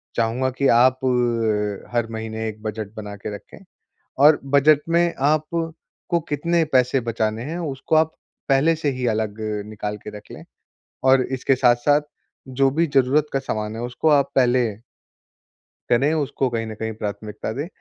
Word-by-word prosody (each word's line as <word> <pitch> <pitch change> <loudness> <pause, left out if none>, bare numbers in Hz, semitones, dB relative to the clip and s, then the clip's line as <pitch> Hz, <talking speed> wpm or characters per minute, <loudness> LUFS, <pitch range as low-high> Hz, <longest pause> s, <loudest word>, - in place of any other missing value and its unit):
चाहूँगा 120 +3 0
कि 140 - +3
आप 130 +2 +4
अ, 115 -5 0
हर 120 -1 +1
महीने 110 0 -4
एक 110 0 -7
बजट 110 -1 -5
बना 105 -1 -7
के 100 +1 -6
रखें - - -13 0.7
और 150 0 +7
बजट 140 +2 +4
में 170 0 +2 0.2
आप 155 0 +1 0.7
को 170 - +2
कितने 165 +3 +1
पैसे 130 +1 +3
बचाने 110 -1 -2
हैं, 160 +5 -4
उसको 150 -2 -3
आप 160 0 +2 0.3
पहले 140 +4 +4
से 155 -2 -1
ही 125 -1 -3
अलग 110 -2 -1 0.3
निकाल 105 -1 -5
के - - -9
रख 105 - -14
लें - - -10 0.6
और 130 0 +5
इसके 130 +1 +1
साथ-साथ 125 +3 +3 0.5
जो 135 +1 +2
भी 165 +5 +1
ज़रूरत 135 +3 +3
का 135 - +1
सामान 110 -5 -4
है, 115 - -5
उसको 125 +6 -1
आप 140 -2 +3
पहले 125 -1 +3 1.3
करें, 140 +6 +3
उसको 140 -3 -1
कहीं 115 -2 -2
न 110 - -7
कहीं 110 +1 -4
प्राथमिकता 105 0 -5
दें। 145 +7 -4
125 Hz, 165 wpm, -22 LUFS, 110-140 Hz, 1.3 s, और